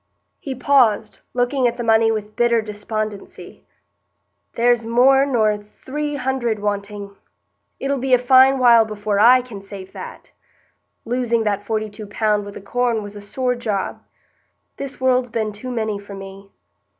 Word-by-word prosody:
He 270 -2 -5
paused, 240 -5 +2
looking 245 +1 +1
at 235 - -2
the 240 - -3
money 225 0 +4
with 215 -1 -4
bitter 235 -1 +3
despondency. 210 -3 -6 0.9
"There's 240 0 +2
more 260 +4 +4
nor 215 -5 +1
three 290 +8 -5
hundred 255 -4 -1
wanting; 205 -1 -4 0.6
it'll 275 0 -1
be 260 0 +3
a - - +3
fine 260 +2 +5
while 240 -3 +6
before 210 -1 -2
I 250 +3 +6
can 220 -6 -9
save 195 -1 -10
that. - - -10 0.7
Losing 235 -1 0
that 205 -1 -1
forty 215 +1 -2
two 210 0 -9
pound 210 0 0
wi' 205 - -8
the - - -10
corn 235 +1 -1
was 205 0 -9
a 205 - -8
sore 250 +5 -1
job. 215 -5 -3 0.8
This 275 0 -6
world's 255 -1 +2
been 220 -1 -2
too 210 +5 -8
many 220 -4 -2
for 200 0 -10
me. 195 0 -11
225 Hz, 155 wpm, -20 LUFS, 205-250 Hz, 0.9 s, while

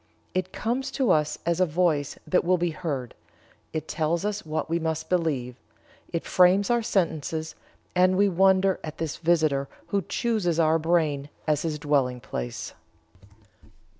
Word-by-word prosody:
It 185 0 -1
comes 245 +4 -2
to 260 -3 +2
us 150 -1 +2
as 170 +1 +1
a 185 - +5
voice 155 -3 0
that 185 - +2
will 180 +1 +3
be 175 -1 0
heard; 145 -7 -4 0.6
it 155 -1 -4
tells 165 +3 -1
us 210 0 -2
what 155 -1 -3
we 165 +1 0
must 160 -1 -3
believe; 140 -9 0 0.5
it 170 - -2
frames 185 +4 +4
our 240 0 +3
sentences 160 -6 -1 0.4
and 185 +1 +4
we 200 +1 +5
wonder 190 +1 +3
at 155 0 -7
this 160 -2 -3
visitor 155 -5 +2 0.2
who 200 - +1
chooses 200 -6 -1
our 160 0 +4
brain 155 -4 +1 0.2
as 150 -1 +1
his 155 -2 -2
dwelling 140 -4 +1
place." - - -5
165 Hz, 155 wpm, -26 LUFS, 155-185 Hz, 0.6 s, a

